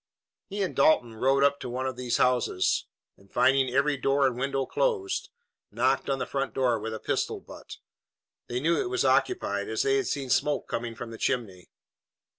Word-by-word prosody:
He 200 Hz, 0 st, -2 dB
and 185 Hz, -, -3 dB
Dalton 120 Hz, -7 st, +3 dB
rode 135 Hz, +4 st, +2 dB
up 140 Hz, 0 st, +3 dB
to -, -, -6 dB
one 130 Hz, +2 st, -3 dB
of 130 Hz, -1 st, -2 dB
these 125 Hz, -1 st, -1 dB
houses, 125 Hz, -7 st, +1 dB, 0.3 s
and, 100 Hz, 0 st, -23 dB
finding 135 Hz, 0 st, +3 dB
every 140 Hz, +3 st, +1 dB
door 135 Hz, +1 st, +2 dB
and 130 Hz, -2 st, +1 dB
window 135 Hz, +1 st, -1 dB
closed, 420 Hz, -, -1 dB, 0.4 s
knocked -, -, 0 dB
on 135 Hz, -, +1 dB
the 125 Hz, -, -2 dB
front 135 Hz, -1 st, -3 dB
door 125 Hz, -4 st, +2 dB
with 110 Hz, +1 st, -4 dB
a -, -, -6 dB
pistol -, -, -2 dB
butt. -, -, -11 dB, 0.7 s
They 120 Hz, +1 st, -2 dB
knew 165 Hz, +5 st, +2 dB
it 370 Hz, -, -3 dB
was 370 Hz, -1 st, 0 dB
occupied, 370 Hz, -1 st, +1 dB
as -, -, 0 dB
they 410 Hz, 0 st, +2 dB
had 400 Hz, -, -1 dB
seen 135 Hz, -3 st, -3 dB
smoke 145 Hz, +1 st, +1 dB
coming 115 Hz, -1 st, -4 dB
from 115 Hz, 0 st, -7 dB
the 115 Hz, -, -9 dB
chimney. 100 Hz, -8 st, -2 dB
135 Hz, 195 wpm, -27 LUFS, 120-145 Hz, 0.7 s, Dalton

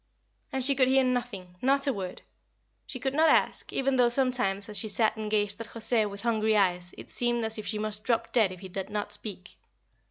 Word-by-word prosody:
And 265 Hz, -1 st, +1 dB
she 280 Hz, -, +7 dB
could 260 Hz, -1 st, +3 dB
hear 265 Hz, 0 st, +4 dB
nothing 240 Hz, -8 st, -3 dB
not 275 Hz, +2 st, +2 dB
a 275 Hz, -, +1 dB
word. 185 Hz, -4 st, -6 dB, 0.6 s
She 255 Hz, -, -4 dB
could 265 Hz, +2 st, -2 dB
not 315 Hz, +2 st, +4 dB
ask, -, -, +1 dB
even 270 Hz, 0 st, 0 dB
though 245 Hz, -1 st, +4 dB
sometimes 240 Hz, -6 st, +1 dB
as 210 Hz, -, -7 dB
she 220 Hz, -, 0 dB
sat 215 Hz, +2 st, +1 dB
and 215 Hz, -1 st, -5 dB
gazed 205 Hz, 0 st, 0 dB
at 230 Hz, -, -6 dB
José 225 Hz, -2 st, 0 dB
with 200 Hz, 0 st, -8 dB
hungry 220 Hz, -2 st, +1 dB
eyes 180 Hz, -3 st, 0 dB
it -, -, -10 dB
seemed 240 Hz, -1 st, 0 dB
as 220 Hz, 0 st, -2 dB
if 215 Hz, -, -7 dB
she 215 Hz, -, -2 dB
must 210 Hz, 0 st, -1 dB
drop 230 Hz, -1 st, -1 dB
dead 220 Hz, -6 st, +3 dB
if 185 Hz, -, -10 dB
he 190 Hz, -, -8 dB
did 190 Hz, +1 st, -6 dB
not 210 Hz, -1 st, -3 dB
speak. 185 Hz, -4 st, -5 dB
220 Hz, 225 wpm, -28 LUFS, 205-250 Hz, 0.6 s, she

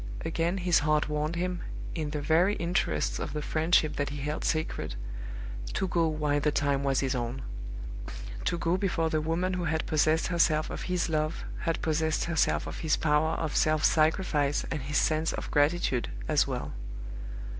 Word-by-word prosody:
Again 170 Hz, +3 st, 0 dB
his 175 Hz, -2 st, +3 dB
heart 150 Hz, 0 st, +2 dB
warned 150 Hz, +2 st, -1 dB
him, 180 Hz, +1 st, -2 dB, 0.3 s
in 155 Hz, -3 st, -2 dB
the 150 Hz, 0 st, -3 dB
very 170 Hz, +7 st, +3 dB
interests 170 Hz, +1 st, 0 dB
of -, -, -4 dB
the 150 Hz, -, -2 dB
friendship 160 Hz, 0 st, +2 dB
that 145 Hz, -, 0 dB
he 145 Hz, -, -5 dB
held 150 Hz, +2 st, -3 dB
sacred, 155 Hz, -, -1 dB, 0.8 s
to 190 Hz, -, 0 dB
go 170 Hz, -2 st, +2 dB
while 150 Hz, -2 st, +1 dB
the 150 Hz, -, +2 dB
time 140 Hz, -1 st, +1 dB
was 135 Hz, -2 st, +2 dB
his 135 Hz, -1 st, 0 dB
own; 120 Hz, +1 st, -3 dB, 1.0 s
to -, -, +1 dB
go 170 Hz, +2 st, +1 dB
before 175 Hz, -4 st, 0 dB
the 155 Hz, -, +1 dB
woman 170 Hz, +4 st, 0 dB
who 180 Hz, -1 st, -1 dB
had 160 Hz, 0 st, 0 dB
possessed 155 Hz, +1 st, +2 dB
herself 165 Hz, -3 st, +2 dB
of -, -, -4 dB
his 180 Hz, -1 st, +1 dB
love 155 Hz, -1 st, -1 dB, 0.2 s
had 165 Hz, -, 0 dB
possessed 160 Hz, 0 st, +1 dB
herself 145 Hz, -, +1 dB
of 80 Hz, +1 st, -6 dB
his 155 Hz, -, +1 dB
power 155 Hz, +1 st, +2 dB
of 155 Hz, -, -2 dB
self 155 Hz, -1 st, +3 dB
sacrifice 155 Hz, -3 st, +2 dB
and 150 Hz, -, -2 dB
his 145 Hz, +2 st, -1 dB
sense 155 Hz, +1 st, +2 dB
of -, -, -5 dB
gratitude 145 Hz, -4 st, +2 dB, 0.2 s
as -, -, +3 dB
well. -, -, -4 dB
155 Hz, 175 wpm, -29 LUFS, 145-170 Hz, 1.0 s, his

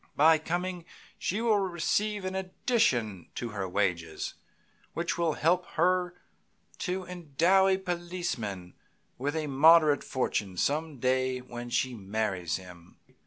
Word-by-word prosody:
By 160 Hz, +2 st, +6 dB
coming 175 Hz, +2 st, -3 dB, 0.3 s
she 205 Hz, +5 st, -1 dB
will 220 Hz, -3 st, +3 dB
receive 195 Hz, +2 st, 0 dB
an 185 Hz, -, -2 dB
addition 185 Hz, -, 0 dB
to 120 Hz, -, -3 dB
her 100 Hz, -3 st, -4 dB
wages 90 Hz, -4 st, -1 dB, 0.6 s
which 170 Hz, +1 st, -1 dB
will 170 Hz, -2 st, +1 dB
help 175 Hz, +4 st, +1 dB
her 180 Hz, +1 st, +2 dB, 0.6 s
to 185 Hz, +1 st, -2 dB
endow 180 Hz, +2 st, +2 dB
a 190 Hz, -1 st, +3 dB
policeman 170 Hz, -, -4 dB, 0.5 s
with 145 Hz, +4 st, -2 dB
a 155 Hz, -1 st, -1 dB
moderate 150 Hz, +1 st, +5 dB
fortune 105 Hz, -7 st, -2 dB
some 150 Hz, -, 0 dB
day 130 Hz, +1 st, +1 dB
when 120 Hz, -1 st, -8 dB
she 130 Hz, +1 st, 0 dB
marries 95 Hz, -5 st, -2 dB
him. 90 Hz, -2 st, -11 dB
155 Hz, 125 wpm, -29 LUFS, 110-180 Hz, 0.6 s, By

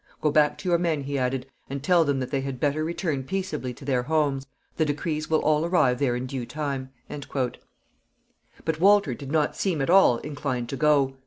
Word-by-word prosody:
"Go 150 Hz, -, +1 dB
back 150 Hz, 0 st, +3 dB
to 185 Hz, -, -4 dB
your 170 Hz, -1 st, +3 dB
men," 165 Hz, -4 st, 0 dB
he 140 Hz, 0 st, -2 dB
added, 125 Hz, 0 st, -1 dB, 0.2 s
"and 135 Hz, 0 st, -5 dB
tell 175 Hz, +1 st, +4 dB
them 140 Hz, -3 st, 0 dB
that 130 Hz, -, -4 dB
they 135 Hz, -2 st, 0 dB
had 135 Hz, -2 st, -5 dB
better 150 Hz, +3 st, +1 dB
return 160 Hz, -4 st, -2 dB
peaceably 165 Hz, -6 st, -3 dB
to 135 Hz, -, -12 dB
their 130 Hz, -3 st, +1 dB
homes. 140 Hz, -1 st, 0 dB, 0.3 s
The 160 Hz, -, +3 dB
decrees 155 Hz, +1 st, -2 dB
will 160 Hz, -1 st, +3 dB
all 155 Hz, 0 st, +3 dB
arrive 170 Hz, -8 st, +2 dB
there 125 Hz, -4 st, +1 dB
in 125 Hz, +1 st, -3 dB
due 130 Hz, -2 st, -5 dB
time." 140 Hz, -3 st, -3 dB, 0.2 s
But 145 Hz, +3 st, -7 dB
Walter 200 Hz, -6 st, +5 dB
did 135 Hz, +3 st, -8 dB
not 155 Hz, -1 st, +1 dB
seem 180 Hz, -6 st, -1 dB
at 135 Hz, +4 st, +1 dB
all 190 Hz, -10 st, +6 dB
inclined 140 Hz, -4 st, -4 dB
to 135 Hz, -, -3 dB
go. 140 Hz, -2 st, +2 dB
145 Hz, 200 wpm, -26 LUFS, 135-155 Hz, 0.3 s, all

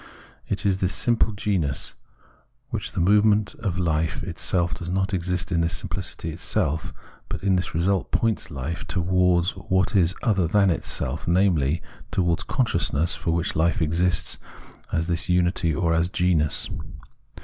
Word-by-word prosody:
It -, -, -2 dB
is 95 Hz, -2 st, +2 dB
the 95 Hz, -, +1 dB
simple 115 Hz, +2 st, +1 dB
genus, 95 Hz, -9 st, -1 dB, 0.8 s
which -, -, -2 dB
in -, -, -9 dB
the 100 Hz, -, +4 dB
movement 105 Hz, 0 st, +4 dB
of 100 Hz, -6 st, -2 dB
hfe 80 Hz, -3 st, 0 dB
itself 85 Hz, -2 st, -1 dB
does 85 Hz, +1 st, -5 dB
not 95 Hz, +2 st, 0 dB
exist 90 Hz, -1 st, -1 dB
in 85 Hz, -1 st, +2 dB
this 85 Hz, +2 st, 0 dB
simpUcity -, -, -5 dB
for -, -, -5 dB
itself; 80 Hz, -1 st, -1 dB, 0.4 s
but -, -, -5 dB
in 95 Hz, -1 st, +3 dB
this 90 Hz, -2 st, -2 dB
result 95 Hz, +2 st, +1 dB
points 115 Hz, -2 st, 0 dB
hfe 80 Hz, +2 st, -5 dB
towards 90 Hz, 0 st, +2 dB
what 95 Hz, +2 st, 0 dB
is 90 Hz, -2 st, +4 dB
other 95 Hz, -8 st, +2 dB
than 100 Hz, +2 st, +3 dB
itself, 75 Hz, -2 st, -2 dB
namely, 85 Hz, -4 st, +2 dB, 0.3 s
towards 85 Hz, -3 st, +1 dB
Consciousness 85 Hz, -, +1 dB
for -, -, -3 dB
which 85 Hz, +1 st, 0 dB
hfe 85 Hz, +2 st, +1 dB
exists 85 Hz, +2 st, +1 dB, 0.5 s
as 80 Hz, -, 0 dB
this 85 Hz, 0 st, -1 dB
unity 90 Hz, -1 st, +2 dB
or 85 Hz, +2 st, +1 dB
as 85 Hz, +1 st, +2 dB
genus. 90 Hz, -7 st, +1 dB
90 Hz, 155 wpm, -24 LUFS, 85-95 Hz, 0.8 s, the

